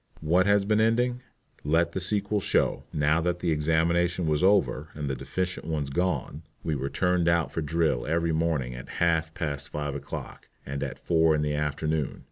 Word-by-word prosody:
What 90 +4 +3
has 100 -1 +4
been 105 +1 +2
the 110 - +5
ending? 120 +2 +1 0.4
Let 80 +3 +2
the 95 - -3
sequel 100 +2 0
show. - - 0
Now 75 +2 +2
that 90 +1 0
the 90 -1 -1
examination 85 +3 +1
was 75 +2 +1
over 95 -5 +2
and 75 -1 -4
the 65 - -1
deficient 90 +7 -3
ones 75 -4 -2
gone, 90 -2 -1 0.2
we 80 - -1
were 70 -1 -2
turned 90 0 +1
out 85 -1 +1
for 80 - -2
drill 75 -4 0
every 85 +1 +1
morning 80 -6 0
at - - -9
half 80 -2 +2
past 70 -3 -4
five 75 -1 -3
o'clock 70 0 -7 0.2
and 70 0 -4
at 70 -2 -4
four 80 -2 +3
in 75 - 0
the 75 0 -1
afternoon. 75 0 -1
80 Hz, 190 wpm, -27 LUFS, 75-90 Hz, 0.4 s, the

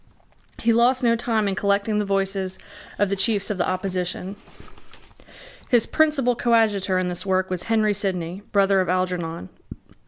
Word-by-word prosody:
He 230 0 +4
lost 250 +3 +3
no 230 -1 +4
time 225 -3 0
in 195 - 0
collecting 200 +2 0
the 210 - -1
voices 195 -1 -1 0.4
of 205 -1 +1
the - - +1
chiefs 200 +1 +1
of 195 - -4
the 175 - +1
opposition. 185 0 -3 1.3
His 240 -3 +3
principal 295 -6 +2
coadjutor 215 -6 +2
in 185 0 0
this 180 -1 -4
work 185 -1 0
was 180 -1 -3
Henry 215 -2 +2
Sidney, 185 -2 -3
brother 195 -1 +3
of 185 - -2
Algernon. 180 - -2
195 Hz, 155 wpm, -23 LUFS, 185-225 Hz, 1.3 s, He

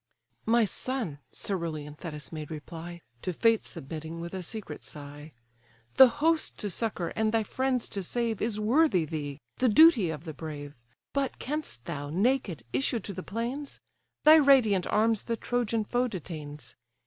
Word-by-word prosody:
"My 230 0 +5
son 220 - -3
(coerulean 160 -6 -3
Thetis 150 -3 -6
made 155 -2 -6
reply, 165 +2 -8 0.2
To 185 - -2
fate 225 +5 +2
submitting 160 +3 -7
with 170 +2 -6
a 190 - -3
secret 180 -4 -6
sigh,) 145 +1 -9 0.7
The 265 - +11
host 310 +6 +1
to 205 - -3
succour, 190 -4 -2
and 220 0 +1
thy 225 0 +2
friends 255 +2 0
to 200 - -3
save, 230 +3 -1
Is 215 -1 0
worthy 220 - +3
thee; 145 -2 -4 0.2
the 255 -1 +3
duty 235 - +7
of 160 0 -5
the 160 - -5
brave. 145 -1 -7 0.4
But 275 -2 -1
canst 290 - -3
thou, 145 -4 -4
naked, 195 - 0
issue 135 - +1
to 200 0 -6
the 185 - -5
plains? 240 +9 -4 0.4
Thy 310 +1 +9
radiant 255 - +5
arms 220 0 +2
the 230 -1 -3
Trojan 235 -2 0
foe 245 +4 0
detains. 150 - -7
200 Hz, 160 wpm, -29 LUFS, 155-240 Hz, 0.7 s, The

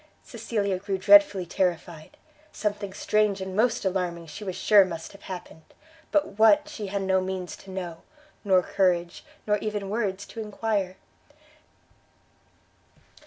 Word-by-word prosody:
Cecilia 200 -5 -2
grew 195 0 -2
dreadfully 205 -3 +6
terrified; 170 -3 -3 0.3
something 205 -2 -3
strange 210 0 +1
and 190 0 -5
most 230 +1 +1
alarming 180 -3 -2
she 185 +6 -9
was 185 -3 -4
sure 205 -2 +6
must 165 -3 -6
have 200 - -15
happened, 180 -3 -8 0.5
but 290 -9 0
what, 295 +7 +5
she 230 -10 -6
had 195 0 -2
no 190 0 +2
means 185 -1 -4
to 195 - -15
know, 175 -3 -6 0.4
nor 190 -3 +4
courage, 175 -3 0 0.2
nor 210 -1 +1
even 210 -2 -4
words 200 -3 -2
to 230 - -10
enquire. 210 -3 -2
195 Hz, 135 wpm, -26 LUFS, 185-210 Hz, 0.5 s, dreadfully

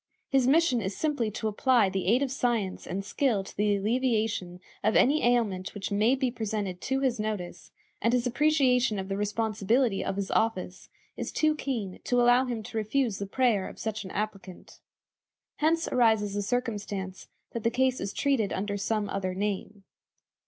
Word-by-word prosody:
His 270 -2 +3
mission 285 -4 +3
is 190 -1 -4
simply 290 -8 0
to 220 +1 -3
apply 230 +1 +3
the 190 -1 -3
aid 245 +7 +4
of 270 - -2
science 235 -7 -1
and 195 +1 -4
skill 230 -5 +1
to - - -12
the 205 0 +2
alleviation 215 -4 0 0.2
of 215 +1 +2
any 295 +4 +4
ailment 220 -7 +1
which 205 0 -4
may 215 +6 +3
be 260 -2 0
presented 210 -5 -3
to 270 0 -1
his 255 -4 0
notice, 210 -5 -4 0.3
and 230 - +2
his 245 0 +1
appreciation 255 -4 +2
of 190 0 -4
the 195 - -1
responsibility 215 +2 0
of 195 - -2
his 200 -1 -3
office 185 -5 -1 0.3
is - - -4
too 310 0 +2
keen 235 -11 -4
to 245 - +2
allow 245 +2 +5
him 235 -3 -4
to 225 - -6
refuse 220 -1 0
the 200 - -4
prayer 220 -3 +1
of - - -12
such 220 -1 -4
an 190 - -8
applicant. 195 -3 -6 0.8
Hence 325 +2 +2
arises 220 -4 +2
the 205 - -1
circumstance 205 -4 -3 0.2
that 235 - -4
the 230 - +2
case 255 +2 +1
is 200 - -3
treated 265 -8 +1
under 200 +1 -2
some 210 +1 -1
other 185 -2 -3
name. 200 0 -3
220 Hz, 180 wpm, -28 LUFS, 200-250 Hz, 0.8 s, allow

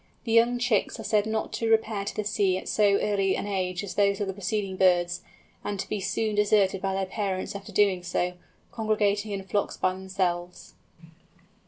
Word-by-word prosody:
The 230 - -3
young 235 +2 +4
chicks 240 -4 0
are - - -5
said 210 -1 +1
not 220 0 -2
to 230 - -1
repair 220 -2 +1
to - - -4
the 215 - -1
sea 200 -3 +1
at - - -7
so 205 -2 +3
early 195 -2 +1
an - - -3
age 185 -2 -2
as 195 - -5
those 200 -1 +2
of 205 - 0
the 195 - -3
preceding 200 0 -2
birds; 180 -1 +3 0.4
and 205 -1 -3
to - - -3
be 210 - -2
soon 215 +3 -1
deserted 205 -2 +3
by 195 -1 -1
their 195 0 0
parents 195 -1 -3
after 200 0 -8
doing 195 -3 +3
so, 180 0 -1 0.4
congregating 215 -2 0
in 195 -1 -3
flocks 200 +2 -1
by 185 - +1
themselves. 185 -2 -3
200 Hz, 195 wpm, -27 LUFS, 190-210 Hz, 0.4 s, young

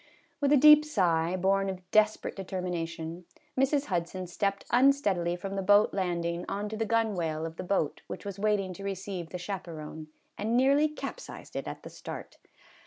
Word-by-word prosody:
With 285 -1 +2
a 295 - +7
deep 300 +2 +9
sigh, 175 - +1
born 195 +1 +2
of 185 -1 -7
desperate 215 0 +2
determination, 175 -3 -4 0.3
Mrs. 275 +2 +2
Hudson 180 0 -2
stepped 195 +3 -2
unsteadily 220 -10 +3
from 195 +2 -5
the 195 - -1
boat 205 +2 +5
land 175 -3 -1
ing 170 +1 -2
on 205 +1 -3
to 220 - -5
the 225 0 -2
gunwale 180 -9 0
of 165 0 -7
the - - -4
boat 180 -5 0
which - - -7
was 200 -1 -6
waiting 200 -3 +1
to 195 - -10
receive 190 -3 -4
the 180 - -5
chaperon, 165 -5 -6 0.3
and 225 +3 +1
nearly 280 +4 +4
capsized 305 +10 -8
it - - -3
at - - -7
the - - -8
start. - - -8
195 Hz, 175 wpm, -29 LUFS, 175-215 Hz, 0.3 s, deep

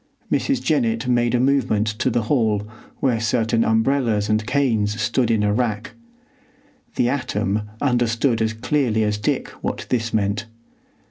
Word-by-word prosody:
Mrs. 275 -2 0
Jennett 120 -6 0
made 120 -1 +2
a - - +2
movement 130 -5 +2
to 110 +4 -1
the 120 -1 0
hall, 110 -4 +1 0.3
where 125 -4 +2
certain 115 0 +1
umbrellas 110 -2 +1
and 110 0 0
canes 110 -6 +1
stood 120 +1 +1
in 110 -2 +2
a 105 0 +2
rack. 110 -2 -1 1.0
The 120 - +2
atom 105 -5 -1
understood 120 -2 +1
as 110 0 0
clearly 115 -1 0
as 105 0 -1
Dick 105 - -1
what - - -3
this 115 -2 0
meant. 105 +1 -1
115 Hz, 145 wpm, -21 LUFS, 110-125 Hz, 1.0 s, made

